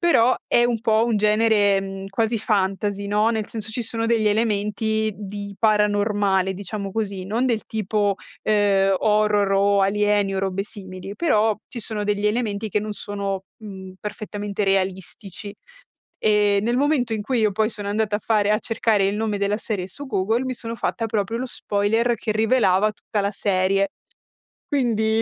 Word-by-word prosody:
però 255 -8 +4
è 240 - +4
un 240 -2 0
po' 220 0 +3
un 230 - +1
genere, 210 -1 +3
mhmm, 195 0 -6
quasi 225 +3 0
fantasy, 200 -1 -1
no, 210 +2 +2
nel 220 -2 -2
senso 220 -1 -5
ci 240 - -2
sono 230 0 -2
degli 225 -2 +2
elementi 215 0 0
di 200 0 -7
paranormale, 205 -3 +2
diciamo 200 +1 -5
così, 200 -4 -3
non 225 +6 0
del 225 -5 0
tipo, 210 -1 0 0.3
ehm, 200 -2 +3
horror 210 -2 +2
o 200 0 +3
alieni 205 0 +2
o - - -1
robe 195 0 -1
simili, 190 -1 -9
però 220 -10 +2
ci 235 - -6
sono 215 -1 -4
degli 205 0 0
elementi 215 -1 -1
che 210 - +1
non 215 0 -4
sono, 200 -2 -4
mhmm, 190 -3 -9
perfettamente 210 -1 -4
realistici. 195 +1 -2 0.6
Ehm, 205 -1 +3
nel 240 +2 +1
momento 275 -5 +1
in 215 - -3
cui 245 +2 0
io 215 -2 +2
poi 215 +2 +1
sono 205 -2 -5
andata 210 0 0
a 210 - -8
fare 210 -2 +1
a 215 - +3
cercare 225 -3 +1
il 200 - -1
nome 215 -1 -1
della 200 +1 0
serie 205 -5 -3
su 285 +9 -7
Google, 220 +3 0
mi 260 0 -2
sono 230 -1 -5
fatta 230 - -2
proprio 220 +1 -1
lo 255 - -3
spoiler 225 +1 +1
che 215 - -2
rivelava 215 -3 +3
tutta 210 0 -3
la 200 +1 -1
serie. 195 0 +1 0.8
Quindi 225 -5 +1
210 Hz, 170 wpm, -23 LUFS, 200-220 Hz, 0.8 s, però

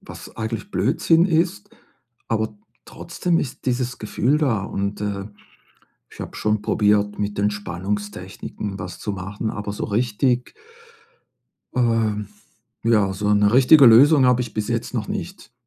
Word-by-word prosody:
was - - -12
eigentlich 115 - -4
Blödsinn 165 0 +2
ist, 185 +5 0 0.6
aber 110 -1 -1 0.3
trotzdem 175 -2 -2
ist 130 - -5
dieses 125 0 -1
Gefühl 120 +6 0
da 115 -10 0
und, 100 +1 -3
äh, 100 -1 -3 0.8
ich - - -13
habe - - -7
schon 105 0 0
probiert 105 -1 +1
mit 105 0 -3
Entspannungstechniken 100 0 -4
was 90 -2 -7
zu 105 - -3
machen, 100 +4 -4
aber 105 -1 -5
so 105 - -4
richtig 120 +3 0 1.2
ähm, 115 -4 +1 0.6
ja, 105 -4 +3
so 105 +2 0
'ne 105 +1 +3
richtige 135 +2 +7
Lösung 135 +4 +7
habe 125 0 +3
ich 120 - -8
bis 105 -1 -2
jetzt 115 +1 -3
noch 120 - -2
nicht. 190 - -6
110 Hz, 140 wpm, -22 LUFS, 105-125 Hz, 1.2 s, richtige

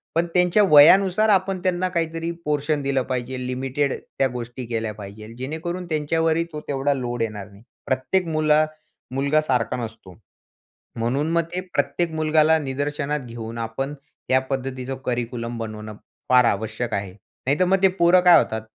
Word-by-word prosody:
पण 170 - +2
त्यांच्या 180 +3 +4
वयानुसार 190 +8 +6
आपण 190 -1 +2
त्यांना 185 0 0
काहीतरी 165 -1 -2
पोर्शन 150 0 0
दिलं 135 -1 0
पाहिजे. 130 0 -3
लिमिटेड 130 +2 -1
त्या 135 - -1
गोष्टी 120 0 -6
केल्या 115 -2 -3
पाहिजेल 110 +2 -10
जेणेकरून 165 +7 -4
त्यांच्यावरही 160 +2 +1
तो 150 - -5
तेवढा 140 0 0
लोड 120 -3 -3
येणार 105 -3 -4
नाही. 100 +3 -17 0.2
प्रत्येक 140 +7 0
मुल 155 -1 0 0.6
मुलगा 140 +3 +2
सारखा 130 -5 0
नसतो. 110 -6 -8 0.8
म्हणून 135 +7 0
मग 170 0 +3
ते 185 - -1
प्रत्येक 145 +4 0
मुलगाला 155 0 +3
निदर्शनात 145 +1 -2
घेऊन 115 0 -7
आपण 125 +6 -3 0.4
या 130 0 +5
पद्धतीचं 130 -1 -3
करिक्युलम 120 -1 -3
बनवणं 110 -1 -6 0.3
फार 125 -1 +6
आवश्यक 110 +2 -1
आहे. 100 -2 -3 0.3
नाहीतर 145 +7 +3
मग 190 +2 +3
ते 190 - +7
पोरं 180 -1 +4
काय 175 -1 +8
होतात? 110 0 -1
140 Hz, 150 wpm, -23 LUFS, 120-160 Hz, 0.8 s, काय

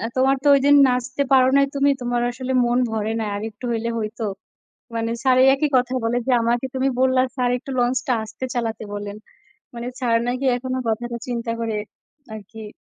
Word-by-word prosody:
"তোমার 265 +1 +3
তো - - +1
ওইদিন 280 +1 +4
নাচতে 250 +2 -1
পারো 260 -1 +6
নাই, 275 - +5
তুমি। 280 0 +3
তোমার 240 0 -1
আসলে 255 +1 -5
মন 240 +1 +1
ভরে 220 0 -2
নাই; 215 -2 -2
আরেকটু 215 +3 -6
হইলে 230 0 -1
হইতো।" 220 +1 -4 0.7
মানে, 230 0 -1
স্যার 260 -1 +4
এই - - +6
একই 300 +1 0
কথা 250 +1 0
বলে 235 +2 0
যে, - - +2
"আমাকে 235 +2 0
তুমি 265 +1 +1
বললা, 260 0 +3
স্যার, 250 -1 +1
একটু 270 +2 -9
লঞ্চটা 245 +1 +1
আস্তে 220 +4 -6
চালাতে 225 -2 -2
বলেন।" 205 0 -5 0.6
মানে, 240 +1 -6
স্যার 235 -2 +2
নাকি 255 +2 -2
এখনও 255 +1 -3
কথাটা 235 +2 -2
চিন্তা 235 -1 -3
করে 225 -2 -2 0.6
আরকি 215 +1 -9
245 Hz, 180 wpm, -22 LUFS, 225-260 Hz, 0.7 s, পারো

